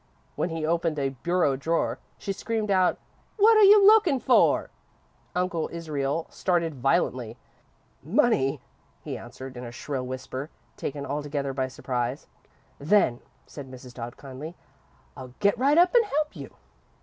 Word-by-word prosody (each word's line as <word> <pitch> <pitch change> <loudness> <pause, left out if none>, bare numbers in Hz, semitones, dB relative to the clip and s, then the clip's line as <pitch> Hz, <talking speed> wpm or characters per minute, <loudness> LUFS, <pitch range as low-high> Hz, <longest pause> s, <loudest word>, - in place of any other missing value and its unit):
When - - -1
he 160 -1 -3
opened 165 -1 0
a 135 -1 0
bureau 145 +2 0
drawer, 160 +5 -1 0.2
she 195 - -4
screamed 220 0 -2
out: 185 -2 +3 0.4
"What 445 +2 +6
are 430 - +7
you 405 0 +8
looking 400 -10 +6
for?" - - +3 0.6
Uncle 180 -2 -1
Israel 155 -2 -2
started 170 -7 -1
violently. 130 -5 0 0.6
"Money," 145 - +1 0.4
he - - -5
answered, 130 0 -9
in 125 - -7
a 120 - -7
shrill 130 +1 -5
whisper, 130 +2 -6 0.3
taken 140 0 -5
altogether 145 -1 -3
by 130 -1 -1
surprise. 125 0 -3 0.5
"Then," 145 -6 +3 0.3
said 140 -3 -10
Mrs. 125 -1 -11
Dodd, 120 -1 -7
kindly, 145 +5 -9 0.6
"I'll 130 -1 -10
get 200 -1 +3
right 280 +5 +3
up 355 +1 +5
and 475 -2 +5
help 300 -5 -2
you!" - - -10
150 Hz, 145 wpm, -26 LUFS, 130-195 Hz, 0.6 s, you